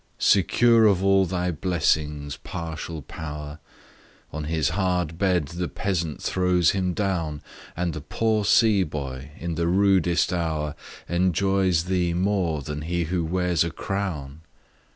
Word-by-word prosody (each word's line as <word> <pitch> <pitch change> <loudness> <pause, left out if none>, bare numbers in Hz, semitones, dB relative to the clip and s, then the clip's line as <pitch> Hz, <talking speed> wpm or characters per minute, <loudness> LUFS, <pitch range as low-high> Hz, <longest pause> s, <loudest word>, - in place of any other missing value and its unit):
Secure 115 +4 +4
of 95 -2 +2
all 95 -1 +4
thy 90 0 -1
blessings, 75 -4 0
partial 80 -1 -6
Power! 75 +2 -7 0.7
On 80 0 -4
his 80 -2 0
hard 90 -3 -1
bed 90 -7 +1
the 85 +1 -3
peasant 85 -6 -3
throws 90 -2 +2
him 90 -2 -1
down; 85 -7 -2 0.3
And 85 -1 -1
the 75 - -6
poor 110 +7 0
sea 105 0 +4
boy, 70 -5 -5
in 85 0 -4
the 85 +1 -1
rudest 90 -2 +3
hour, 80 -3 -1 0.3
Enjoys 95 0 +2
thee 90 -1 0
more 90 -5 0
than 75 +1 -5
he 85 +2 -1
who 85 +1 -1
wears 90 0 +1
a 85 - -2
crown. 80 -5 -4
85 Hz, 135 wpm, -24 LUFS, 80-95 Hz, 0.7 s, Secure